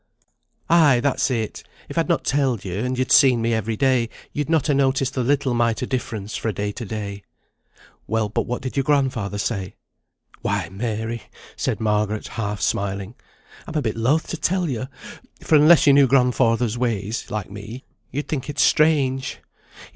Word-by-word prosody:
"Ay, 155 -7 +5
that's 140 +2 +1
it! 115 -4 -2 0.3
If - - -8
I'd - - 0
not - - +1
telled 135 -7 0
you, 95 +1 -3
and 125 +2 -2
you'd 130 0 -1
seen 130 -4 +6
me 115 0 0
every 110 0 -1
day, 130 -4 +2 0.2
you'd 150 +1 -2
not 160 -4 +2
ha' 150 - +2
noticed 135 -1 +1
the 130 - -1
little 135 0 +1
mite 120 0 +1
o' - - 0
difference 110 -5 -4
fra' 110 - -2
day 105 +1 -3
to 115 +3 -7
day." 100 -1 -5 0.9
"Well, 110 0 0
but 105 - -2
what 125 +1 -3
did 130 - -5
your 135 - +1
grandfather 130 -8 0
say?" 100 -2 -3 0.7
"Why, 100 -4 -1
Mary," 110 +3 -3 0.3
said - - -2
Margaret, 105 -1 -1
half 105 -3 -4
smiling, 100 +1 -2 0.5
"I'm 160 - -7
a 155 - +2
bit 110 - -1
loath 130 +8 +1
to 170 - -3
tell 180 +2 0
yo, 130 -3 -3 0.6
for - - -1
unless 155 +2 +7
yo 140 - +7
knew 140 -1 +6
grandfather's 125 -3 +2
ways 110 -3 -2
like 105 -2 -4
me, 105 +5 -8 0.3
yo'd 145 +3 -4
think 140 -2 -3
it 145 - -6
strange. 140 -4 +2
120 Hz, 175 wpm, -22 LUFS, 105-135 Hz, 0.9 s, unless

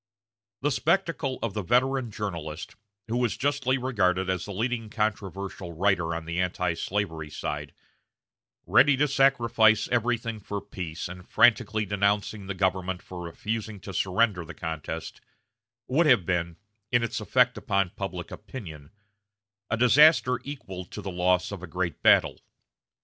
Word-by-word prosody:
The 145 +2 +1
spectacle 165 -4 0
of 115 -4 -2
the 105 - -2
veteran 125 +5 +1
journalist, 85 -7 -5 0.3
who 115 +2 -1
was 120 -3 0
justly 135 -1 +1
regarded 95 -8 +1
as 90 -2 -2
the 105 - -7
leading 115 +2 -2
controversial 100 -4 -3
writer 85 -2 +1
on 85 -1 -5
the 85 +2 -1
antislavery 90 -2 -2
side, - - -4 0.9
ready 145 -1 +5
to 145 +2 +3
sacrifice 115 -6 +4
everything 115 -2 0
for 100 0 -4
peace, 90 -5 -6
and 90 0 -11
frantically 110 -2 +4
denouncing 100 0 0
the 100 - -3
government 95 -1 -1
for 90 -1 -8
refusing 105 +5 -4
to 95 - -8
surrender 95 0 +1
the 80 - -10
contest, 80 -2 -5 0.7
would 155 +5 +3
have 120 - +5
been, 85 -2 -1 0.3
in 120 -1 +3
its 115 - -2
effect 125 +3 +3
upon 100 -6 0
public - - -6
opinion, 80 - -9 0.8
a 110 - 0
disaster 125 +1 +5
equal 115 -10 -7
to - - -9
the 95 - -4
loss 90 +1 +1
of 100 -3 -6
a 95 - -7
great 85 -1 -3
battle. - - +4
100 Hz, 145 wpm, -27 LUFS, 90-120 Hz, 0.9 s, ready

